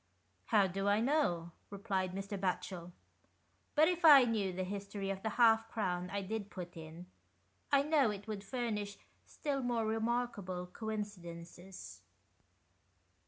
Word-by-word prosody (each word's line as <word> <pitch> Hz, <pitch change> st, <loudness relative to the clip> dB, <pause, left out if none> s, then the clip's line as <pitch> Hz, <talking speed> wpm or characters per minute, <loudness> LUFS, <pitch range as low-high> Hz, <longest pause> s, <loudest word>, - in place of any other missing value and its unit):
"How 210 Hz, -4 st, +4 dB
do 195 Hz, +2 st, -2 dB
I 205 Hz, +1 st, +4 dB
know?" 225 Hz, -, +1 dB, 0.2 s
replied 195 Hz, -2 st, -2 dB
Mr. 200 Hz, +1 st, -4 dB
Batchel, 180 Hz, -2 st, -3 dB, 0.4 s
" -, -, -41 dB
but 310 Hz, +1 st, +6 dB
if 355 Hz, 0 st, -1 dB
I 290 Hz, -5 st, +10 dB
knew 220 Hz, -5 st, 0 dB
the 185 Hz, +1 st, -3 dB
history 200 Hz, +1 st, -4 dB
of 195 Hz, -1 st, -5 dB
the 220 Hz, -, -1 dB
half 225 Hz, -2 st, +5 dB
crown 180 Hz, -5 st, -2 dB
I 200 Hz, 0 st, -2 dB
did 205 Hz, +1 st, -4 dB
put 180 Hz, -3 st, -8 dB
in, 165 Hz, +2 st, -9 dB, 0.7 s
I 280 Hz, -1 st, +5 dB
know 295 Hz, -5 st, +3 dB
it 205 Hz, 0 st, -6 dB
would 210 Hz, -2 st, -4 dB
furnish 210 Hz, -3 st, -3 dB, 0.3 s
still 280 Hz, -3 st, -2 dB
more 240 Hz, -3 st, 0 dB
remarkable 220 Hz, -5 st, -1 dB
coincidences." 180 Hz, -3 st, -7 dB
205 Hz, 140 wpm, -34 LUFS, 185-230 Hz, 0.7 s, I